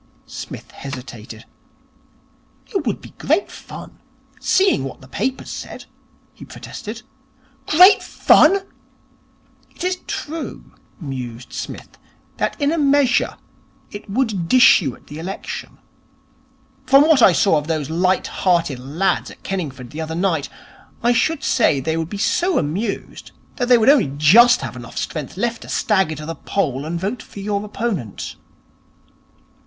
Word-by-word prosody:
Psmith -, -, -9 dB
hesitated. 120 Hz, -5 st, -9 dB, 1.3 s
'It 360 Hz, -10 st, -1 dB
would 215 Hz, -, -1 dB
be -, -, -12 dB
great 315 Hz, +8 st, +1 dB
fun -, -, -11 dB, 0.4 s
seeing 380 Hz, -, +2 dB
what 135 Hz, -, -7 dB
the 130 Hz, -, -15 dB
papers 260 Hz, -, -3 dB
said,' -, -, -8 dB, 0.5 s
he -, -, -13 dB
protested. 230 Hz, -1 st, -8 dB, 0.6 s
'Great 370 Hz, +6 st, +7 dB
fun!' 395 Hz, +1 st, +4 dB, 1.1 s
'It -, -, -10 dB
is 365 Hz, 0 st, 0 dB
true,' 320 Hz, +2 st, -6 dB, 0.3 s
mused 125 Hz, -6 st, -7 dB
Psmith, -, -, -7 dB, 0.4 s
'that -, -, -2 dB
in 285 Hz, 0 st, +2 dB
a 330 Hz, -, 0 dB
measure, 280 Hz, -2 st, +2 dB, 0.5 s
it 205 Hz, 0 st, -9 dB
would 210 Hz, -6 st, -1 dB
dish 255 Hz, +1 st, +7 dB
you 135 Hz, -7 st, -3 dB
at -, -, -22 dB
the 150 Hz, +2 st, -9 dB
election. 190 Hz, +4 st, -6 dB, 1.1 s
From 275 Hz, +2 st, +7 dB
what 310 Hz, -6 st, +5 dB
I 195 Hz, -, +8 dB
saw 175 Hz, -3 st, +3 dB
of 150 Hz, -, -9 dB
those 155 Hz, -2 st, -2 dB
light 185 Hz, +3 st, +1 dB
hearted 170 Hz, -8 st, 0 dB
lads 165 Hz, +9 st, -1 dB
at -, -, -15 dB
Kenningford 140 Hz, -10 st, -5 dB
the 155 Hz, -, -5 dB
other 160 Hz, 0 st, -4 dB
night, 170 Hz, -5 st, 0 dB, 0.5 s
I 240 Hz, +1 st, +4 dB
should 315 Hz, +4 st, +1 dB
say 185 Hz, -, +3 dB
they 160 Hz, +4 st, -1 dB
would 165 Hz, 0 st, -2 dB
be 205 Hz, -, -5 dB
so 350 Hz, -, +1 dB
amused 195 Hz, +8 st, -3 dB, 0.2 s
that 245 Hz, -, -1 dB
they 245 Hz, -1 st, +7 dB
would 225 Hz, -, +1 dB
only 270 Hz, -, +5 dB
just 235 Hz, +12 st, +6 dB
have -, -, -5 dB
enough 120 Hz, -2 st, -10 dB
strength 150 Hz, 0 st, -4 dB
left 230 Hz, +3 st, -1 dB
to -, -, -11 dB
stagger 190 Hz, -7 st, +1 dB
to 150 Hz, +1 st, -8 dB
the 165 Hz, -, -4 dB
poll 145 Hz, -7 st, -2 dB
and 170 Hz, +2 st, -3 dB
vote 205 Hz, +6 st, -3 dB
for -, -, -12 dB
your 200 Hz, 0 st, -2 dB
opponent.' 205 Hz, -, -4 dB
190 Hz, 150 wpm, -20 LUFS, 150-245 Hz, 1.3 s, I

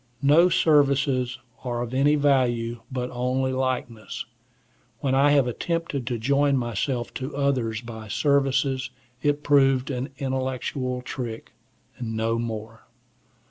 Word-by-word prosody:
No 160 Hz, +6 st, +6 dB
services 140 Hz, -6 st, +3 dB, 0.3 s
are 120 Hz, -2 st, -2 dB
of 120 Hz, +1 st, -6 dB
any 140 Hz, +3 st, +4 dB
value, 120 Hz, -5 st, +1 dB
but 125 Hz, -1 st, -3 dB
only 130 Hz, +1 st, 0 dB
likeness. 125 Hz, -4 st, -3 dB, 0.7 s
When 135 Hz, -2 st, 0 dB
I 140 Hz, +2 st, +5 dB
have 145 Hz, -2 st, +4 dB
attempted 145 Hz, 0 st, -2 dB
to 125 Hz, -2 st, -1 dB
join 140 Hz, +4 st, +2 dB
myself 120 Hz, +1 st, -2 dB
to 130 Hz, +3 st, -5 dB
others 125 Hz, -6 st, 0 dB
by 110 Hz, -2 st, -8 dB
services, 135 Hz, +1 st, +1 dB, 0.3 s
it 145 Hz, 0 st, +1 dB
proved 135 Hz, -2 st, +3 dB
an 130 Hz, +2 st, -3 dB
intellectual 130 Hz, -1 st, -2 dB
trick,—no 115 Hz, -2 st, -5 dB
more. 115 Hz, -1 st, -6 dB
130 Hz, 115 wpm, -25 LUFS, 120-140 Hz, 0.7 s, No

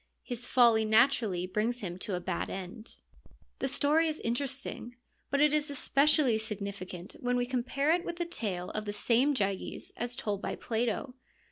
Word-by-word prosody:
His 245 Hz, 0 st, -5 dB
folly 235 Hz, -3 st, +5 dB
naturally 220 Hz, -5 st, +3 dB
brings 220 Hz, +6 st, -1 dB
him 180 Hz, -2 st, -5 dB
to 190 Hz, 0 st, -2 dB
a -, -, -2 dB
bad 175 Hz, -, -3 dB
end. 195 Hz, +4 st, -7 dB, 0.6 s
The 270 Hz, -, 0 dB
story 295 Hz, +4 st, +3 dB
is 310 Hz, 0 st, -2 dB
interesting, 245 Hz, 0 st, -3 dB, 0.3 s
but 280 Hz, -, +1 dB
it 300 Hz, 0 st, +5 dB
is 305 Hz, 0 st, +1 dB
especially 280 Hz, -3 st, +3 dB
signi 210 Hz, -2 st, -4 dB
ficant 185 Hz, -1 st, -8 dB
when 245 Hz, 0 st, +1 dB
we 245 Hz, -, +1 dB
compare 260 Hz, +4 st, 0 dB
it 345 Hz, +1 st, +2 dB
with 345 Hz, -, -4 dB
the 345 Hz, 0 st, -2 dB
tale 200 Hz, -, -3 dB
of 215 Hz, 0 st, -3 dB
the 205 Hz, -, -3 dB
same 245 Hz, +7 st, +3 dB
Gyges 195 Hz, -4 st, -2 dB
as 240 Hz, +1 st, -2 dB
told 205 Hz, -6 st, -2 dB
by -, -, -3 dB
Plato. 235 Hz, +2 st, -2 dB
240 Hz, 175 wpm, -31 LUFS, 205-275 Hz, 0.6 s, folly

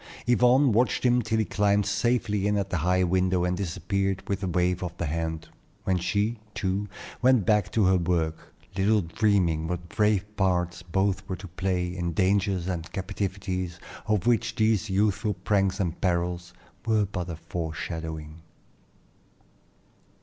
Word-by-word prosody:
Yvonne 125 Hz, +2 st, +4 dB
watched 120 Hz, +4 st, +2 dB
him 125 Hz, 0 st, +4 dB
till 110 Hz, 0 st, -1 dB
he 110 Hz, -, +2 dB
climbed 100 Hz, +1 st, +2 dB
safely 105 Hz, 0 st, +1 dB
in 105 Hz, 0 st, +1 dB
at 100 Hz, -1 st, -2 dB
the 90 Hz, -, +1 dB
high 90 Hz, +3 st, +2 dB
window 90 Hz, 0 st, +2 dB
and 90 Hz, 0 st, 0 dB
disappeared 95 Hz, +1 st, -2 dB
with 100 Hz, 0 st, -2 dB
a 95 Hz, -, -2 dB
wave 90 Hz, +1 st, +1 dB
of 90 Hz, 0 st, -5 dB
the 85 Hz, -, -2 dB
hand, 80 Hz, +1 st, -3 dB, 0.4 s
when 95 Hz, -1 st, +1 dB
she, 105 Hz, +6 st, 0 dB, 0.2 s
too, 100 Hz, +1 st, -1 dB, 0.3 s
went 125 Hz, -5 st, +4 dB
back 105 Hz, -4 st, +2 dB
to 110 Hz, -3 st, +2 dB
her 95 Hz, 0 st, +4 dB
work, 85 Hz, -2 st, -1 dB, 0.2 s
little 105 Hz, +2 st, +3 dB
dreaming 85 Hz, -3 st, +1 dB
what 85 Hz, 0 st, -4 dB
brave 105 Hz, -2 st, +2 dB
parts 90 Hz, -3 st, 0 dB
both 95 Hz, +3 st, -1 dB
were 95 Hz, -, -1 dB
to 95 Hz, +3 st, -9 dB
play 90 Hz, 0 st, -2 dB
in 85 Hz, -2 st, -2 dB
dangers 95 Hz, 0 st, +1 dB
and 85 Hz, -3 st, -4 dB
captivities 95 Hz, -2 st, -3 dB, 0.3 s
of 105 Hz, -2 st, +1 dB
which 120 Hz, -1 st, +2 dB
these 110 Hz, -1 st, +2 dB
youthful 105 Hz, +1 st, +1 dB
pranks 95 Hz, 0 st, +1 dB
and 90 Hz, -4 st, -2 dB
perils 90 Hz, -1 st, -1 dB, 0.3 s
were 110 Hz, -3 st, +2 dB
but 90 Hz, -3 st, -5 dB
a 85 Hz, -, -4 dB
foreshadowing. 80 Hz, -1 st, -5 dB
95 Hz, 155 wpm, -27 LUFS, 90-105 Hz, 0.4 s, Yvonne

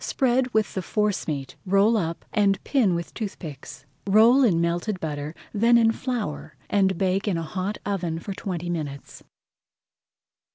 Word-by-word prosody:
Spread 255 Hz, -1 st, +1 dB
with 220 Hz, -2 st, +1 dB
the 190 Hz, -, -2 dB
forcemeat, 175 Hz, -9 st, -2 dB
roll 200 Hz, +4 st, +3 dB
up, 170 Hz, -5 st, -2 dB
and 200 Hz, -3 st, +3 dB
pin 225 Hz, -11 st, +2 dB
with 170 Hz, 0 st, -5 dB
toothpicks. 150 Hz, -, -7 dB, 0.2 s
Roll 225 Hz, +7 st, +6 dB
in 185 Hz, -9 st, +3 dB
melted 175 Hz, +4 st, -1 dB
butter, 150 Hz, 0 st, -4 dB, 0.2 s
then 230 Hz, +3 st, +4 dB
in 225 Hz, -1 st, +4 dB
flour, 230 Hz, -, -4 dB, 0.2 s
and 190 Hz, -3 st, +2 dB
bake 190 Hz, +2 st, 0 dB
in 190 Hz, -5 st, +1 dB
a 165 Hz, -, -2 dB
hot 185 Hz, +5 st, -3 dB
oven 180 Hz, -5 st, -2 dB
for 195 Hz, +4 st, -5 dB
twenty 180 Hz, -3 st, -4 dB
minutes. 150 Hz, -5 st, -5 dB
195 Hz, 150 wpm, -25 LUFS, 165-215 Hz, 0.2 s, Roll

